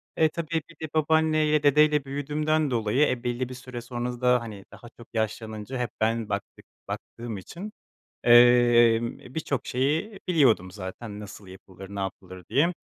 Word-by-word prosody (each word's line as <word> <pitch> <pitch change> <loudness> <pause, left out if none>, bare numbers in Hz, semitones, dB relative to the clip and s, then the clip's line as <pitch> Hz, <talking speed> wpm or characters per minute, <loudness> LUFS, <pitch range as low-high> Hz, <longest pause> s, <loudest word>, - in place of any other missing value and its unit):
E, 160 -1 +4
tabii, 165 0 -2
bir 165 - -15
de 155 - -11
babaanneyle, 155 -1 +2
dedeyle 150 0 +4
büyüdüğümden 150 +2 -1
dolayı, 115 +5 +2
e, 125 -1 -3
belli 120 +1 -2
bir - - -7
süre 125 -1 -8
sonra 120 0 -5
da 125 -1 +4
hani 105 -4 -9
daha 120 - -13
çok 120 - -13
yaşlanınca 110 +2 -3
hep 120 - -1
ben 115 -1 0
baktık 100 -1 -5 0.2
baktığım 115 -3 -6
için, 180 - -8 0.5
emm, 120 -1 +5
birçok 140 0 -4
şeyi 155 - -1
biliyordum 125 - +3
zaten 100 +2 -7
nasıl 105 -1 -10
yapılır, 95 0 -12
ne - - -4
yapılır 95 -1 -6
diye. 165 +6 +2
125 Hz, 155 wpm, -26 LUFS, 110-150 Hz, 0.5 s, emm